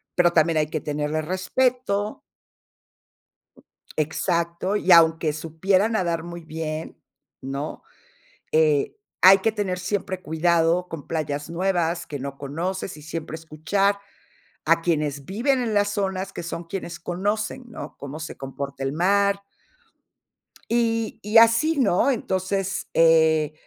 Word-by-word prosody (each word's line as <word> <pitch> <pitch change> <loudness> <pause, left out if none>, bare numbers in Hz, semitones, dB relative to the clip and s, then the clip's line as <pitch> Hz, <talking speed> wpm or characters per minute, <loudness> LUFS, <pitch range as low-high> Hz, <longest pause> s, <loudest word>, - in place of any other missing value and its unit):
pero 175 -1 +4
también 160 0 +3
hay 150 -1 +2
que 155 -1 -3
tenerle 150 +1 -2
respeto. 205 +4 -1 1.8
Exacto. 170 +4 -1
Y 190 -3 +1
aunque 160 -2 +6
supiera 185 +7 +1
nadar 170 -7 -1
muy 175 0 -8
bien, 160 0 -5 0.4
¿no? 140 +3 -5 0.7
Eh, 155 - +2 0.3
hay 195 +1 +9
que 220 +3 0
tener 195 -4 -2
siempre 185 0 -3
cuidado 170 +2 +2
con 160 -3 -8
playas 150 -1 -3
nuevas 175 -1 0
que 145 - -5
no 140 +1 -6
conoces, 170 +6 -4
y 150 - -12
siempre 160 0 -5
escuchar 195 +6 0 0.7
a 165 +1 +4
quienes 150 -5 -1
viven 255 +7 +1
en 220 -3 -1
las 205 0 +2
zonas, 195 -2 -2
que - - -6
son 170 0 -5
quienes 170 -1 -6
conocen, 205 +8 -2
¿no? 230 - -9
Cómo 140 +3 -7
se 160 - -7
comporta 135 0 -6
el 135 - -1
mar. 200 +4 +2 1.3
Y 230 -1 0
y 210 +2 +2
así, 230 +8 +5
¿no? 220 0 +3
Entonces, 195 -3 -2
eh, 160 -2 +4
170 Hz, 130 wpm, -24 LUFS, 155-200 Hz, 1.8 s, hay